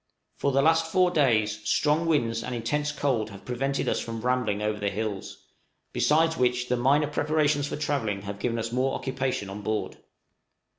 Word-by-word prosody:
For 140 - 0
the 135 +1 +3
last 165 +1 +3
four 180 0 +3
days 110 -9 +2
strong 150 +9 +2
winds 115 -8 +1
and 125 - -4
intense 150 +6 -1
cold 130 -7 -1
have 100 -2 -12
prevented 135 +2 -1
us - - +1
from 115 -1 -5
rambling 125 -4 0
over 105 0 -1
the 100 - 0
hills, 105 -1 -4 0.6
besides 160 +2 +3
which 125 0 +1
the 125 - +2
minor 135 +5 +3
preparations 150 -1 +1
for - - -4
travelling 115 -10 -1
have 100 0 -6
given 115 +1 -1
us 115 0 -3
more 130 +2 0
occupation 130 -5 -2
on 100 +2 -7
board. 110 +1 -3
125 Hz, 180 wpm, -27 LUFS, 110-145 Hz, 0.6 s, the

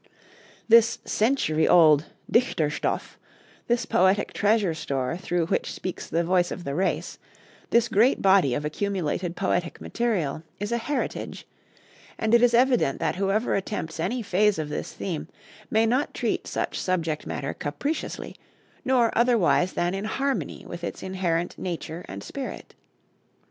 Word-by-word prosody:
This 230 0 +6
century 210 - +1
old 155 -3 +6 0.2
'Dichterstoff,' 160 - 0 0.5
this 240 0 +1
poetic 190 +3 +2
treasure 205 -4 +2
store 140 -2 -2
through 175 -1 -1
which - - -1
speaks 185 - -5
the 170 +2 +1
voice 175 0 +2
of 180 - -6
the 140 - -3
race, 185 +5 -1 0.5
this 235 0 +3
great 225 +4 +3
body 190 -10 +4
of 145 - -3
accumulated 180 0 -2
poetic 175 -3 -1
material, 195 -12 -1 0.2
is 205 +2 -3
a 235 - +1
heritage; 285 +5 -3 0.7
and 220 +1 0
it 235 - +7
is 240 -1 +5
evident 245 - +3
that 165 +1 -1
whoever 200 +4 +1
attempts 185 -5 -3
any 240 +8 -1
phase 205 +1 +2
of 155 -2 -3
this 150 - -4
theme 170 -6 -4 0.4
may 220 +1 +3
not 255 +6 0
treat - - -1
such - - -2
subject 165 -4 -1
matter 135 - -3
capriciously, 280 - -4 0.5
nor 250 -3 +2
otherwise 230 -6 +3
than 175 +1 0
in 195 +2 -3
harmony 270 +5 -2
with 170 0 -8
its - - -5
inherent 175 -2 -2
nature 170 -1 -5
and 100 +1 -7
spirit. 275 -2 -7
190 Hz, 145 wpm, -25 LUFS, 165-230 Hz, 0.7 s, it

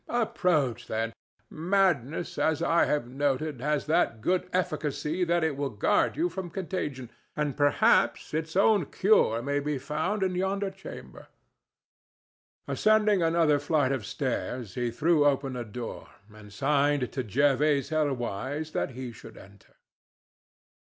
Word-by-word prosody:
Approach, 155 - 0
then. 115 +1 -2 0.4
Madness, 170 -4 0
as 160 +1 +1
I 170 0 +3
have 145 -5 -1
noted, 140 +1 -1
has 150 +1 0
that 155 -7 +1
good 180 +9 0
efficacy 155 -1 -1
that 170 0 +1
it 160 -3 0
will 140 0 -2
guard 125 - +1
you 335 +3 +2
from 190 - -6
contagion, 150 - -4 0.2
and 150 -3 -1
perhaps 145 +1 +2
its 160 +1 -3
own 195 -4 +4
cure 120 - +3
may 140 +2 0
be 145 0 -2
found 160 +10 -2
in 185 -1 0
yonder 190 +2 -1
chamber." 190 0 -11 1.4
Ascending 215 -3 +3
another 165 -3 +3
flight 145 -2 +1
of 125 -7 -3
stairs, 125 -5 -3
he 120 -1 -1
threw 150 +5 +2
open 135 -2 +1
a 120 - -3
door 115 +2 -7 0.2
and 105 -1 -14
signed 140 +2 +1
to 130 - -2
Jervase 140 +4 +2
Helwyse 145 0 -2
that 135 - -2
he 125 0 -6
should 110 - -13
enter. 100 +1 -17
145 Hz, 135 wpm, -28 LUFS, 130-170 Hz, 1.4 s, own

